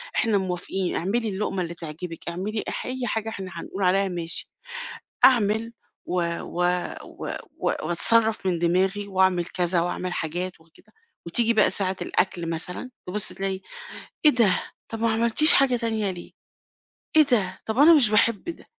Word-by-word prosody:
إحنا 220 -3 +2
موافقين. 185 0 -3
اعملي 220 +6 -1
اللُقمة 195 -1 -3
اللي 170 -1 -4
تعجبِك، 165 +1 -7
اعملي 200 +5 -3
أح - - -5
أي 255 +1 -4
حاجة 220 0 -2
إحنا 190 -4 -7
هنقول 195 - -5
عليها 195 +2 +3
ماشي." 170 -2 -3 0.8
أعمل 225 -2 +3 0.3
و 180 0 -1 0.2
و 175 - -4 0.4
و - - -9 0.3
و - - -5 0.2
وأتصرّف 220 +4 +5
من 180 -2 0
دماغي 190 +4 0
وأعمل 190 -2 +2
كذا 175 0 0
وأعمل 180 +1 -3
حاجات 175 +2 -4
وكده 160 0 -23 0.3
وتيجي 230 +7 +2
بقى 215 - +4
ساعة 190 -1 -1
الأكل 175 -3 -1
مثلًا، 180 +9 -5 0.2
تبُص 200 +3 +2
تلاقي 190 -1 -3 0.6
"إيه 300 - +9
ده؟ 230 -9 +3 0.3
طَب 225 - -6
ما 230 0 +2
عملتيش 235 +7 +5
حاجة 270 -3 +4
تانية 220 -3 -1
ليه؟ 175 -2 -9 0.9
إيه 310 - +9
ده؟ 210 -9 0
طَب 220 +2 -4
أنا 315 +4 +7
مش 250 -8 +4
باحب 215 0 +2
ده، 340 - -8
195 Hz, 155 wpm, -24 LUFS, 180-225 Hz, 0.9 s, إيه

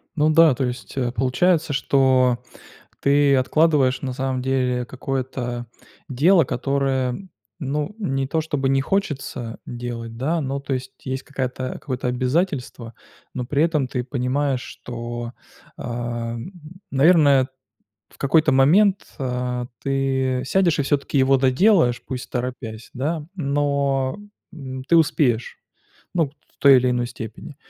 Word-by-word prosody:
Ну 155 -1 +3
да, 155 -3 +6
то 135 - -1
есть, 125 +2 -6
э, 125 -2 0
получается, 145 +7 +1
что 130 -3 +3 0.6
ты 140 0 +4
откладываешь 135 -1 +2
на 130 -2 -3
самом 130 0 -2
деле 125 -1 0
какое-то 125 -1 -4 0.4
дело, 165 +7 +4
которое, 135 +5 -1 0.3
ну, 145 +7 -2
не 135 -10 -1
то 160 +4 0
чтобы 145 -4 -1
не 135 0 +3
хочется 135 - -3
делать, 120 -1 -6
да, 155 +7 0
но, 140 -1 -3
то 140 0 -3
есть, 130 0 -5
есть 130 0 -3
какая-то 130 -2 -4
какое-то 125 -3 -3
обязательство, 125 -2 -1 0.4
но 125 - -3
при 140 +4 +1
этом 155 -5 +1
ты 125 -1 -3
понимаешь, 130 +1 -1
что, 120 0 -6 0.4
ам, 120 +2 -4 0.4
наверное, 140 -2 +5 0.6
в - - -22
какой-то 155 +2 +3
момент, 185 +10 +4
а, 125 -1 -2 0.2
ты 135 -2 0
сядешь 170 +2 +2
и - - +2
всё-таки 140 +1 -1
его 135 +1 +4
доделаешь, 130 - +3
пусть 130 -2 -5
торопясь, 120 -3 -5
да, 150 +4 -2
но, 140 -4 0 0.4
м, 130 -5 -7
ты 170 - +3
успеешь, 130 -7 +2 0.6
ну, 165 -5 +2
в 140 - -29
той 140 -1 +7
или 125 0 +3
иной 120 -1 0
степени. 120 -2 -9
135 Hz, 130 wpm, -22 LUFS, 125-145 Hz, 0.6 s, той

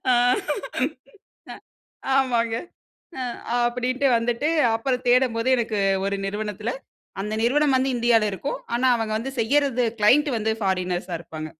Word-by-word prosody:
ஆ, - - +6 1.4
அ, - - -7 0.6
ஆமாங்க 235 -4 +1 0.6
அ - - -2 0.4
அப்டின்ட்டு 250 +3 0
வந்துட்டு, 235 +5 0 0.3
அப்பறம் 250 +2 -1
தேடம்போது 245 -1 +2
எனக்கு 225 -3 -1 0.3
ஒரு 200 - -1
நிறுவனத்தில, 210 +2 -3 0.5
அந்த 210 +2 -3
நிறுவனம் 285 +3 +3
வந்து 265 +1 +1
இந்தியால 230 -3 +3
இருக்கும். 275 +9 -4 0.2
ஆனா 260 - +1
அவங்க 220 -1 -3
வந்து 265 +4 -5
செய்யறது, 255 0 +2 0.2
கிளையன்ட்டு 265 +5 +4
வந்து 220 0 0
ஃபாரினர்ஸா 180 -2 -1
இருப்பாங்க. 155 -1 -8
235 Hz, 125 wpm, -23 LUFS, 215-260 Hz, 1.4 s, ஆ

